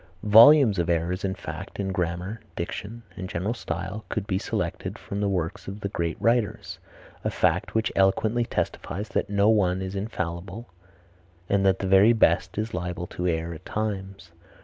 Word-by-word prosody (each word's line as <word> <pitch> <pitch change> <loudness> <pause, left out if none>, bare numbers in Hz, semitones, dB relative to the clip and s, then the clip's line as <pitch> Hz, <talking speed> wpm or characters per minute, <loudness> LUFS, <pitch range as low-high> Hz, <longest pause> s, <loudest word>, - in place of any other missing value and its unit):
Volumes 115 0 +7
of 85 - 0
errors 85 +3 0
in 95 -1 -1
fact, - - -8
in 95 -1 -1
grammar, 90 +4 -3 0.2
diction 105 +7 -5
and 95 0 -6
general 95 +7 -2
style, 110 -3 -5
could 105 - -2
be 95 -2 -1
selected - - -3
from 100 +1 -5
the 100 - +1
works 90 -4 -3
of 100 +2 -7
the 100 - -2
great 85 -4 -3
writers, 115 -2 0 0.4
a - - 0
fact - - 0
which 110 0 +1
eloquently 110 +5 +2
testifies 105 -2 -3
that - - -1
no 100 0 +3
one 95 -4 +3
is 95 0 -4
infallible 95 +1 -4 0.8
and 100 0 +2
that 95 -1 +3
the 95 - -3
very 95 +4 +6
best 110 - +2
is 110 +1 -2
liable 90 0 -3
to 90 0 -4
err 85 0 -1
at 80 +2 -11
times. 95 -4 -4
95 Hz, 170 wpm, -26 LUFS, 90-105 Hz, 0.8 s, Volumes